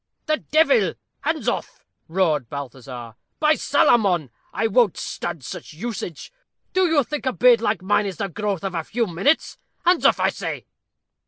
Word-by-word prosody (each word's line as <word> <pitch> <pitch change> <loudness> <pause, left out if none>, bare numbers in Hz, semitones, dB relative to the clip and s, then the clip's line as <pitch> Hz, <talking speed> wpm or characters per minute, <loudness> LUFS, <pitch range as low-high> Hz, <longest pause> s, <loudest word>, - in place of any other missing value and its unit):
"The 310 0 +1
devil! 320 +12 +3 0.2
hands - - -2
off," - - -3 0.2
roared 160 -8 +1
Balthazar. 125 -4 -7 0.3
"By 305 0 +4
Salamon, 195 - +2 0.2
I - - -1
won't 225 -2 +3
stand 170 -5 -5
such 130 - -8
usage. 195 - -6 0.4
Do 375 -1 +3
you 310 -4 +3
think 295 +1 -4
a - - +3
beard 245 -2 +5
like 205 -5 0
mine 205 +1 +2
is 190 -4 -5
the 200 - -2
growth 200 0 -3
of 195 -1 -3
a 165 -2 -2
few 230 +7 -1
minutes? 195 - 0 0.3
Hands 355 0 +4
off! - - +4
I - - +3
say." - - -5
205 Hz, 165 wpm, -23 LUFS, 165-260 Hz, 0.4 s, beard